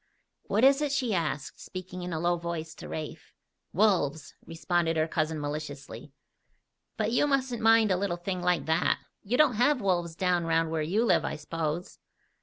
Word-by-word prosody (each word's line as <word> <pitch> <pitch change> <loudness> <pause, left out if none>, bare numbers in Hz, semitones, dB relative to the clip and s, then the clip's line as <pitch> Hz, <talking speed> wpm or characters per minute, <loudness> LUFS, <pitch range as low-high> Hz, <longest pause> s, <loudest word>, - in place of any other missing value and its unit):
"What 215 +4 +1
is 275 +2 +6
it?" 295 -2 0
she 255 -5 0
asked, 150 -6 -2
speaking 185 0 -7
in 180 0 -5
a 160 - -2
low 175 +1 +2
voice 170 -2 -5
to - - -10
Rafe. 155 -1 -7 0.4
"Wolves!" 170 -7 +1
responded 165 0 0
her 155 0 +2
cousin 155 -1 -1
maliciously. 145 -3 -6 0.9
"But 215 0 0
you 250 +5 +3
mustn't 260 -4 0
mind 225 -2 +5
a 185 - +3
little 185 -2 -1
thing 180 +1 -4
like 180 -1 +1
that. 160 0 +2 0.2
You 230 +5 -1
don't 280 -8 +4
have 285 +2 +4
wolves 175 -5 0
down 180 -2 +1
round 165 0 +1
where 160 -1 -1
you 195 +10 +1
live, - - +3
I - - -3
s'pose?" 165 +2 -4
175 Hz, 180 wpm, -28 LUFS, 160-215 Hz, 0.9 s, is